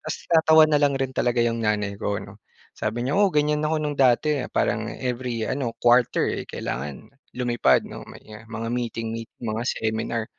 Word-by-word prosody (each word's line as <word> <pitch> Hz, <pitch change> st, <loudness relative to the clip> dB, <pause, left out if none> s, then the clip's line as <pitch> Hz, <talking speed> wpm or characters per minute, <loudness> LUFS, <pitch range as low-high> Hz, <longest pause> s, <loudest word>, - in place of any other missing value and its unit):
Tapos -, -, -4 dB, 0.2 s
natatawa 160 Hz, -1 st, +7 dB
na 150 Hz, -, +4 dB
lang 145 Hz, -1 st, +3 dB
rin 135 Hz, -1 st, -2 dB
talaga 120 Hz, -2 st, +1 dB
'yong 115 Hz, 0 st, 0 dB
nanay 105 Hz, -2 st, -1 dB
ko, 100 Hz, -, -1 dB
'no, 100 Hz, +1 st, -12 dB, 0.3 s
sabi 115 Hz, +3 st, -3 dB
niya, 135 Hz, -, -1 dB
"Oo 205 Hz, -, +5 dB
ganyan 150 Hz, 0 st, +2 dB
ako 160 Hz, +1 st, 0 dB
no'ng 150 Hz, -1 st, -3 dB
dati 135 Hz, +3 st, +3 dB, 0.2 s
parang -, -, +1 dB
every 125 Hz, -2 st, -3 dB
ano, 125 Hz, -3 st, -2 dB
quarter 120 Hz, 0 st, +4 dB
eh -, -, -5 dB
kailangan 70 Hz, -, -6 dB, 0.2 s
lumipad, 120 Hz, -1 st, +2 dB
'no, -, -, -9 dB
may, -, -, -13 dB
ah, 110 Hz, +1 st, -12 dB
mga 115 Hz, 0 st, -5 dB
meeting 115 Hz, -2 st, -3 dB
meet, 115 Hz, 0 st, -6 dB
mga 110 Hz, 0 st, -2 dB
seminar." 110 Hz, 0 st, -2 dB
120 Hz, 185 wpm, -24 LUFS, 110-135 Hz, 0.3 s, natatawa